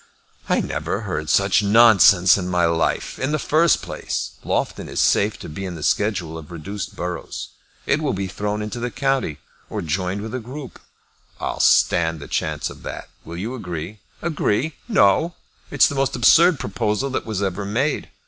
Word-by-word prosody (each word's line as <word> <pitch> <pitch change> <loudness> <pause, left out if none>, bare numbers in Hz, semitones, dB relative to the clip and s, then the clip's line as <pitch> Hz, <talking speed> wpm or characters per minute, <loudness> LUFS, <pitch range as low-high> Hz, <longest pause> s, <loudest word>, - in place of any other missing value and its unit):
"I - - +3
never 80 +7 -3
heard 90 -7 -4
such 100 +2 +3
nonsense 100 -4 +6
in 95 -3 -3
my 90 -1 +2
life. 85 -1 -1
In 130 +2 -1
the 155 - +1
first 155 +2 +2
place, - - -4
Loughton - - -2
is - - -3
safe 105 +1 +2
to - - -9
be 80 +6 -7
in 90 -2 -5
the 80 - -7
schedule 85 0 0
of 75 - -12
reduced 100 +5 -6
boroughs. 90 -1 -5 0.4
It 155 - +1
will 145 -3 0
be 95 0 -3
thrown 105 +3 -3
into 105 +3 -5
the 120 +1 -2
county, 135 - -1 0.3
or - - -4
joined 90 +5 -2
with 110 - -6
a 130 - -2
group." 130 +4 -9 0.6
"I'll - - -3
stand 80 -1 +3
the 70 - -9
chance 75 -1 -2
of - - -13
that. - - -7
Will 85 - -8
you 110 +8 -4
agree?" 90 -3 -6 0.2
"Agree! 155 -3 0
No! 170 - +3 0.3
It's - - +5
the - - -4
most 135 -1 0
absurd 160 +6 +5
proposal 105 +5 -1
that 130 - -3
was 105 -3 -2
ever 95 +1 -2
made. 120 +9 -1
100 Hz, 180 wpm, -22 LUFS, 90-130 Hz, 0.6 s, nonsense